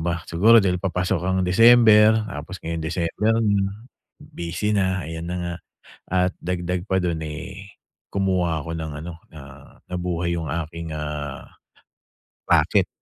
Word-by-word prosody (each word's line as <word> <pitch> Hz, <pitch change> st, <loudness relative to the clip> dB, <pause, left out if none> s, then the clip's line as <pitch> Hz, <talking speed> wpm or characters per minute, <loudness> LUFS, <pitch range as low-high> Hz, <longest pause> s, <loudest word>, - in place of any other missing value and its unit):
ba. 85 Hz, 0 st, 0 dB
Siguro 105 Hz, +8 st, +5 dB
dahil 90 Hz, -4 st, +1 dB
papasok 90 Hz, -1 st, -1 dB
ang 95 Hz, +1 st, 0 dB
December 110 Hz, +2 st, +6 dB
tapos 85 Hz, -2 st, -7 dB
ngayong 80 Hz, 0 st, -3 dB
December 85 Hz, +7 st, 0 dB
na, 100 Hz, +1 st, 0 dB, 0.3 s
busy 85 Hz, +5 st, -4 dB
na, 95 Hz, -3 st, 0 dB
ayan 80 Hz, +2 st, -6 dB
na 90 Hz, -, -3 dB
nga. 85 Hz, -1 st, -3 dB, 0.6 s
At 90 Hz, 0 st, +2 dB
dagdag 90 Hz, 0 st, -3 dB
pa 95 Hz, -2 st, 0 dB
dun, 85 Hz, -3 st, -2 dB
eh, 95 Hz, +6 st, -8 dB, 0.4 s
kumuha 90 Hz, -5 st, 0 dB
ako 80 Hz, +3 st, -5 dB
ng 80 Hz, -1 st, -5 dB
ano, 85 Hz, +3 st, -7 dB, 0.2 s
na 80 Hz, -, -10 dB, 0.5 s
nabuhay 90 Hz, -1 st, -2 dB
yung 80 Hz, -, -3 dB
aking, 80 Hz, 0 st, -5 dB
ah, 75 Hz, -2 st, -5 dB, 1.0 s
raket, -, -, +3 dB
90 Hz, 140 wpm, -23 LUFS, 80-95 Hz, 1.0 s, December